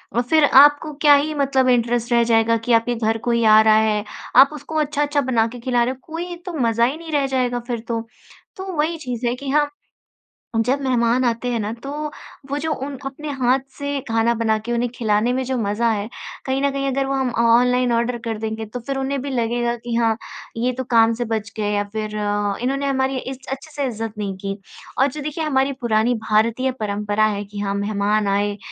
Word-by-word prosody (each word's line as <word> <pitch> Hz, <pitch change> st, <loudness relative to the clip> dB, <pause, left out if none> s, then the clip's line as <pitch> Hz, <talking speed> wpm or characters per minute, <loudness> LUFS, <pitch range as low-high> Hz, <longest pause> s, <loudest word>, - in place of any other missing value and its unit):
अ, 240 Hz, -, +3 dB
फिर 310 Hz, +5 st, +3 dB, 0.2 s
आपको 295 Hz, +1 st, +3 dB
क्या 295 Hz, -2 st, +7 dB
ही 300 Hz, +2 st, +1 dB
मतलब 270 Hz, -2 st, +2 dB
इंटरेस्ट 240 Hz, -1 st, +1 dB
रह 235 Hz, 0 st, +5 dB
जाएगा 225 Hz, +1 st, +3 dB
कि 245 Hz, -, +2 dB
आपके 230 Hz, +1 st, +2 dB
घर 225 Hz, 0 st, 0 dB
कोई 235 Hz, -1 st, +2 dB
आ 215 Hz, 0 st, +8 dB
रहा 220 Hz, 0 st, +5 dB
है। 215 Hz, -1 st, +2 dB, 0.3 s
आप 270 Hz, +2 st, +8 dB
उसको 300 Hz, +2 st, -8 dB
अच्छा-अच्छा 295 Hz, -1 st, 0 dB
बना 235 Hz, -4 st, +1 dB
के 245 Hz, +1 st, -9 dB
खिला 240 Hz, -1 st, +1 dB
रहे 255 Hz, -, -1 dB
हो, 265 Hz, -, -17 dB
कोई 345 Hz, +2 st, -5 dB
तो 360 Hz, -, -5 dB
मज़ा 230 Hz, +1 st, +3 dB
ही 275 Hz, +5 st, -1 dB
नहीं 325 Hz, -1 st, -9 dB
रह 285 Hz, -2 st, +1 dB
जाएगा 250 Hz, -2 st, 0 dB
फिर 240 Hz, -2 st, -2 dB
तो। 230 Hz, -1 st, -3 dB, 0.5 s
तो 380 Hz, 0 st, -6 dB
वही 320 Hz, +3 st, 0 dB
चीज़ 250 Hz, -5 st, -4 dB
है 240 Hz, -, 0 dB
कि 275 Hz, +1 st, -7 dB
हाँ, 295 Hz, +1 st, +2 dB, 1.0 s
जब 270 Hz, +3 st, +1 dB
मेहमान 250 Hz, -1 st, +2 dB
आते 235 Hz, +1 st, -1 dB
हैं 235 Hz, -, -1 dB
ना, 210 Hz, +1 st, -2 dB
तो 255 Hz, +4 st, -8 dB, 0.6 s
वो 285 Hz, -, -1 dB
जो 320 Hz, -, -1 dB
उन 275 Hz, 0 st, -5 dB
अपने 285 Hz, +3 st, -6 dB
हाथ 255 Hz, +1 st, +3 dB, 0.2 s
से 285 Hz, 0 st, -2 dB
खाना 225 Hz, +1 st, +2 dB
बना 220 Hz, -1 st, +2 dB
के, 240 Hz, -, -3 dB
उन्हें 240 Hz, +1 st, 0 dB
खिलाने 215 Hz, +1 st, +1 dB
में 260 Hz, -, -1 dB
जो 260 Hz, -, -2 dB
मज़ा 220 Hz, +2 st, 0 dB
है, 210 Hz, -1 st, -2 dB, 0.4 s
कहीं 265 Hz, +1 st, 0 dB
न 280 Hz, -, +2 dB
कहीं 275 Hz, 0 st, -2 dB
अगर 270 Hz, 0 st, 0 dB
वो 270 Hz, -, -2 dB
हम 265 Hz, -1 st, 0 dB
ऑनलाइन 250 Hz, +1 st, +4 dB
ऑर्डर 235 Hz, +1 st, 0 dB
कर 225 Hz, -2 st, -2 dB
देंगे, 220 Hz, 0 st, -4 dB
तो 220 Hz, +4 st, -7 dB
फिर 270 Hz, +3 st, -4 dB
उन्हें 270 Hz, +1 st, -1 dB
भी 280 Hz, -, -5 dB
लगेगा 240 Hz, -1 st, 0 dB
कि, 240 Hz, 0 st, -6 dB
"हाँ, 230 Hz, -1 st, +2 dB, 0.4 s
ये 250 Hz, +2 st, +1 dB
तो 260 Hz, -, -2 dB
काम 230 Hz, -1 st, +5 dB
से 240 Hz, -, 0 dB
बच 220 Hz, -2 st, -3 dB
गए।" 210 Hz, -1 st, -1 dB
या 205 Hz, 0 st, +1 dB
फिर, 215 Hz, -1 st, -3 dB, 0.5 s
"इन्होंने 275 Hz, +3 st, -1 dB
हमारी 265 Hz, -1 st, 0 dB
इस 260 Hz, 0 st, -5 dB
अच्छे 275 Hz, +4 st, -6 dB
से 285 Hz, -1 st, -2 dB
इज़्ज़त 225 Hz, -2 st, -4 dB
नहीं 200 Hz, -2 st, -3 dB
की।" 195 Hz, +1 st, -4 dB, 0.4 s
और 270 Hz, -, +4 dB
जो 300 Hz, -, -6 dB
देखिए, 305 Hz, +2 st, -3 dB
हमारी 275 Hz, -2 st, +1 dB
पुरानी 230 Hz, 0 st, +2 dB
भारतीय 230 Hz, +5 st, +2 dB
परंपरा 210 Hz, 0 st, 0 dB
है 205 Hz, -1 st, -1 dB
कि 205 Hz, 0 st, -9 dB
हाँ, 200 Hz, -1 st, -1 dB
मेहमान 205 Hz, +1 st, 0 dB
आए, 205 Hz, +1 st, 0 dB
245 Hz, 220 wpm, -21 LUFS, 225-275 Hz, 1.0 s, आ